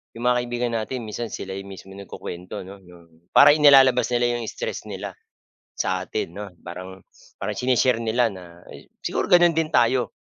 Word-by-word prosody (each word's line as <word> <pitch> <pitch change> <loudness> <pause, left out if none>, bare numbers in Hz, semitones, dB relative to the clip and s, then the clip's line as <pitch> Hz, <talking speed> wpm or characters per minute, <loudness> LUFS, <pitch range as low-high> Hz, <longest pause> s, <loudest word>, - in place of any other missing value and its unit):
'yong 115 - -8
mga 125 0 +3
kaibigan 120 0 -2
natin, 120 +2 -5
minsan 110 +2 -5
sila 95 -2 -7
yung 100 - -10
mismo 95 0 -11
nagkukuwento, 90 -2 -8
ano. 100 +1 -12
Yung, 85 -1 -19
para 145 +1 +9
inilalabas 135 -5 +6
nila 120 0 +2
'yong 120 -2 -3
stress - - -5
nila, - - -6 0.7
sa - - -1
atin, 85 - -4
'no. 105 0 -7 0.2
Parang 95 +2 -9 0.3
parang 105 +1 -3
shine-share 125 -1 +1
nila 115 +2 +2
na 90 -1 -14
s - - -14
siguro - - -3
gano'n 175 -2 +6
din 160 -1 0
tayo. 120 +1 +2
115 Hz, 175 wpm, -23 LUFS, 95-125 Hz, 0.7 s, para